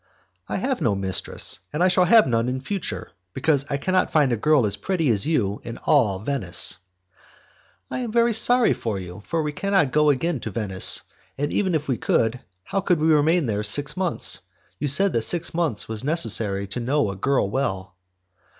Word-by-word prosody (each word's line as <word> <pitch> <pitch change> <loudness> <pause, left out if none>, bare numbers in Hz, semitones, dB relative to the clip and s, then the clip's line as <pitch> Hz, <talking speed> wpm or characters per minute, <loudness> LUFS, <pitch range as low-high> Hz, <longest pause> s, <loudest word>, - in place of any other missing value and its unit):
"I - - -2
have 265 -1 -2
no 105 -4 +1
mistress, 95 -2 -3
and 155 +4 0
I - - +5
shall 180 0 +3
have 220 +4 +6
none 115 0 0
in 130 +1 -3
future, 190 +7 -5 0.2
because 150 -4 0
I 140 - -1
could 165 +6 -3
not 185 - +1
find 145 -5 +3
a - - +2
girl 140 +2 +2
as 100 - -1
pretty 175 -7 -1
as 105 +4 0
you 105 -11 0
in 115 - -7
all 120 -11 +2
Venice." 105 -7 +1 1.1
"I - - -3
am 240 -3 -4
very 235 +1 +2
sorry 245 +2 +4
for 110 -4 -4
you, 90 +1 -8
for 165 -2 -1
we 150 - -2
cannot 190 -4 0
go 150 +1 +3
again 145 +2 0
to 110 - -6
Venice; 100 -3 +1 0.3
and 145 +2 -2
even 190 -4 0
if 155 -1 -2
we 130 -4 0
could, 115 +2 0 0.2
how 195 - -2
could 180 -4 +1
we 160 +1 +2
remain 155 +2 +2
there 105 -3 -1
six 140 +8 -3
months? 185 -3 0 0.4
You 150 - -1
said 190 +8 +3
that 115 - +1
six 170 +8 +2
months 165 -10 0
were 110 -1 -5
necessary 110 - +1
to 110 - -4
know 130 -2 0
a - - -7
girl 130 +3 0
well." 95 -8 -3
140 Hz, 200 wpm, -23 LUFS, 110-170 Hz, 1.1 s, have